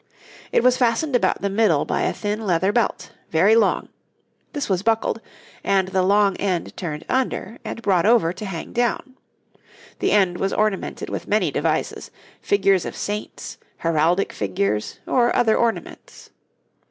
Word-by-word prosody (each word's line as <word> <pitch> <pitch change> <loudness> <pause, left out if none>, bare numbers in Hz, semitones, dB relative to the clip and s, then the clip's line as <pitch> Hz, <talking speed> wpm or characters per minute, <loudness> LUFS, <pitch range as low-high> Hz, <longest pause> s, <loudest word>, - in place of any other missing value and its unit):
It - - +2
was 255 0 +4
fastened 250 +3 +1
about 245 - +1
the 200 - +1
middle 195 -8 +2
by - - -1
a - - +1
thin 210 +1 -3
leather 185 +2 +2
belt, 235 +1 -1 0.2
very 190 +7 +4
long; 230 - +2 0.7
this 290 - -3
was 190 -2 0
buckled, 225 +1 0 0.4
and 190 -1 +1
the 190 0 +1
long 200 +1 +3
end 185 -4 -2
turned 155 -4 -5
under 245 -4 -2
and 230 - -6
brought 190 -2 +2
over 220 -8 +4
to 190 +4 -7
hang 175 -5 -6
down; 245 +2 -1 0.8
the - - +1
end 185 -4 +2
was 195 - -1
ornamented 210 -2 -1
with - - -5
many - - +1
devices - - -2 0.3
figures 195 -3 +2
of - - -6
saints, 210 +1 -5 0.2
heraldic 165 +3 +1
figures, 105 +1 -2
or 240 -2 +2
other 225 -3 +3
ornaments. 230 -1 -3
200 Hz, 155 wpm, -22 LUFS, 180-230 Hz, 0.8 s, was